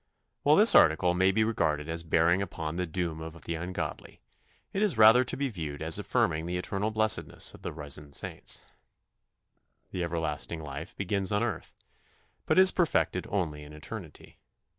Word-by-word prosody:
" -, -, -52 dB
While -, -, +4 dB
this -, -, +8 dB
article 90 Hz, -1 st, +5 dB
may 95 Hz, +2 st, +3 dB
be 110 Hz, +3 st, +1 dB
regarded 80 Hz, -9 st, -1 dB
as 80 Hz, 0 st, -3 dB
bearing 85 Hz, +2 st, +2 dB
upon 80 Hz, -4 st, -5 dB
the 90 Hz, 0 st, -2 dB
doom 80 Hz, -1 st, -4 dB
of 80 Hz, +1 st, -9 dB
the 85 Hz, -, -4 dB
ungodly, 85 Hz, +3 st, -6 dB, 0.6 s
it 195 Hz, -, -1 dB
is 205 Hz, -, +1 dB
rather 110 Hz, +3 st, +7 dB
to 125 Hz, -, -3 dB
be 140 Hz, 0 st, -1 dB
viewed 80 Hz, -, -6 dB
as 80 Hz, 0 st, +2 dB
affirming 80 Hz, 0 st, 0 dB
the 90 Hz, +1 st, -2 dB
eternal 100 Hz, +3 st, -2 dB
blessedness 110 Hz, -7 st, +1 dB
of -, -, -14 dB
the -, -, -5 dB
risen 75 Hz, -1 st, -7 dB
saints. -, -, -4 dB, 1.3 s
The 90 Hz, -, -3 dB
everlasting 80 Hz, -1 st, -3 dB
life 75 Hz, +4 st, -8 dB
begins 100 Hz, 0 st, -2 dB
on 105 Hz, +2 st, +1 dB
earth, 110 Hz, -8 st, -5 dB, 0.7 s
but -, -, +2 dB
is 185 Hz, 0 st, +8 dB
perfected 175 Hz, -3 st, 0 dB
only 80 Hz, -7 st, -2 dB
in 75 Hz, +1 st, -12 dB
eternity. 80 Hz, +1 st, -10 dB
85 Hz, 170 wpm, -28 LUFS, 80-105 Hz, 1.3 s, this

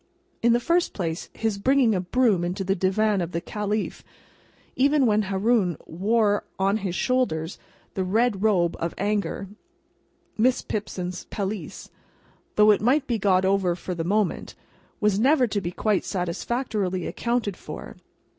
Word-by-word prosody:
In 235 Hz, 0 st, +4 dB
the 240 Hz, -, +3 dB
first 340 Hz, +7 st, +1 dB
place, 165 Hz, -4 st, -4 dB
his 220 Hz, -3 st, -2 dB
bringing 260 Hz, 0 st, +3 dB
a 185 Hz, -, 0 dB
broom 205 Hz, -1 st, +2 dB
into 180 Hz, +3 st, -2 dB
the 190 Hz, +1 st, +1 dB
Divan 195 Hz, +2 st, +1 dB
of 175 Hz, 0 st, -4 dB
the 170 Hz, -, 0 dB
Caliph, 210 Hz, +3 st, -3 dB, 0.7 s
even 280 Hz, +1 st, +3 dB
when 215 Hz, -2 st, +3 dB
Haroun 195 Hz, -3 st, +1 dB
wore 205 Hz, +4 st, +1 dB
on 195 Hz, +2 st, +2 dB
his 190 Hz, -4 st, -3 dB
shoulders 195 Hz, -11 st, 0 dB, 0.3 s
the 190 Hz, -, -1 dB
red 210 Hz, +2 st, +1 dB
robe 185 Hz, -6 st, +2 dB
of 170 Hz, 0 st, -3 dB
anger 200 Hz, 0 st, -1 dB, 0.9 s
(Miss 250 Hz, +3 st, +3 dB
Pipson's 185 Hz, -4 st, -4 dB
pelisse), 200 Hz, -1 st, -5 dB, 0.6 s
though 210 Hz, 0 st, +6 dB
it 205 Hz, -, +2 dB
might 265 Hz, +6 st, +3 dB
be 235 Hz, -4 st, -1 dB
got 190 Hz, -2 st, +3 dB
over 190 Hz, -2 st, +2 dB
for 180 Hz, +1 st, -5 dB
the 170 Hz, -2 st, -3 dB
moment, 205 Hz, +3 st, -1 dB, 0.4 s
was 210 Hz, -2 st, +2 dB
never 265 Hz, +2 st, +4 dB
to 205 Hz, -3 st, -2 dB
be 175 Hz, -, -3 dB
quite 205 Hz, +1 st, 0 dB
satisfactorily 190 Hz, 0 st, -2 dB
accounted 235 Hz, -5 st, -1 dB
for. -, -, -9 dB
205 Hz, 150 wpm, -25 LUFS, 185-230 Hz, 0.9 s, though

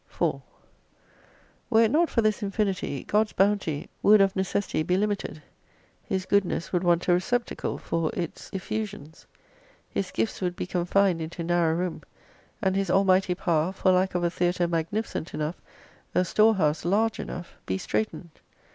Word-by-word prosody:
4 -, -, -1 dB, 1.3 s
Were 225 Hz, -1 st, +5 dB
it 225 Hz, -, +2 dB
not 330 Hz, +4 st, +3 dB
for 230 Hz, -, +1 dB
this 215 Hz, +1 st, +1 dB
infinity, 195 Hz, -, -2 dB
God's 210 Hz, +1 st, +1 dB
bounty 190 Hz, -6 st, +1 dB
would 210 Hz, +1 st, +7 dB
ot 195 Hz, -1 st, +3 dB
necessity 190 Hz, -2 st, -1 dB
be 180 Hz, +4 st, +1 dB
limited. 200 Hz, -6 st, -2 dB, 0.6 s
His 190 Hz, -1 st, -2 dB
goodness 190 Hz, -2 st, 0 dB
would 180 Hz, 0 st, +1 dB
want 175 Hz, -1 st, +2 dB
a 180 Hz, -, +5 dB
re 175 Hz, -, +4 dB
ceptacle 245 Hz, +5 st, -2 dB
for 165 Hz, -1 st, -1 dB
its 170 Hz, -3 st, -5 dB
effusions. 195 Hz, -5 st, -5 dB, 0.6 s
His 190 Hz, -, -3 dB
gifts 220 Hz, -, -2 dB
would 180 Hz, -1 st, -1 dB
be -, -, -3 dB
confined 180 Hz, 0 st, +1 dB
into 165 Hz, +2 st, -5 dB
narrow 170 Hz, -1 st, +2 dB
room, 175 Hz, -1 st, -2 dB, 0.6 s
and 190 Hz, -1 st, +2 dB
His 195 Hz, -2 st, 0 dB
Almighty 190 Hz, -1 st, +3 dB
Power 170 Hz, -1 st, +1 dB
for 190 Hz, -1 st, +2 dB
lack 185 Hz, 0 st, +2 dB
of 175 Hz, -, 0 dB
a 170 Hz, -, +1 dB
theatre 175 Hz, 0 st, +1 dB
magnificent 170 Hz, +2 st, -2 dB
enough, 155 Hz, +3 st, -3 dB, 0.5 s
a 180 Hz, -, +3 dB
storehouse 190 Hz, -7 st, +3 dB
large 215 Hz, +6 st, +1 dB
enough, 175 Hz, -, -7 dB
be 95 Hz, -, 0 dB
straitened. 110 Hz, -, -3 dB
185 Hz, 155 wpm, -26 LUFS, 170-200 Hz, 1.3 s, would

